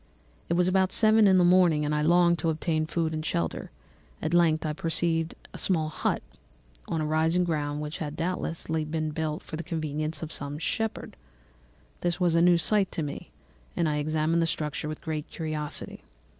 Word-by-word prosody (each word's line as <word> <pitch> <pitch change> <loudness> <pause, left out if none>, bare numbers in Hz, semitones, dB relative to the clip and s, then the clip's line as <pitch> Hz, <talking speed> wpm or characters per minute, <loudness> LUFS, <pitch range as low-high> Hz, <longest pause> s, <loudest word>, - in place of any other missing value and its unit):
"It 170 - +2
was 180 0 +3
about 185 0 +2
seven 220 -1 +5
in 190 -1 +5
the 180 - +5
morning, 175 -4 +4
and 150 - 0
I 150 - +1
longed 170 +1 +4
to 165 - 0
obtain 155 0 0
food 160 -1 -1
and 155 0 -3
shelter; 85 - -2 0.5
at 160 +2 -2
length 165 -2 +3
I 155 - -1
perceived 165 +1 0 0.2
a - - -8
small 160 -5 +1
hut, - - -1 0.6
on 160 - -1
a - - -1
rising 160 +3 +2
ground, 150 -3 -2
which 150 +1 -5
had 150 -2 -4
doubtless 165 0 -3
been 155 -1 -2
built 155 0 -3
for 155 - -7
the 170 - -5
convenience 155 -1 -3
of 160 - -6
some 140 0 -3
shepherd. 220 +7 -2 0.8
This 175 0 -1
was 175 -2 +2
a 165 - +4
new 175 0 +6
sight 200 +3 +2
to 160 - -2
me, 145 -1 -6 0.5
and 170 - +2
I 150 -1 0
examined 155 +2 +1
the 165 - +2
structure 150 -1 -3
with 155 - -6
great 155 -2 -4
curiosity. 155 -2 -4
160 Hz, 190 wpm, -27 LUFS, 155-175 Hz, 0.8 s, new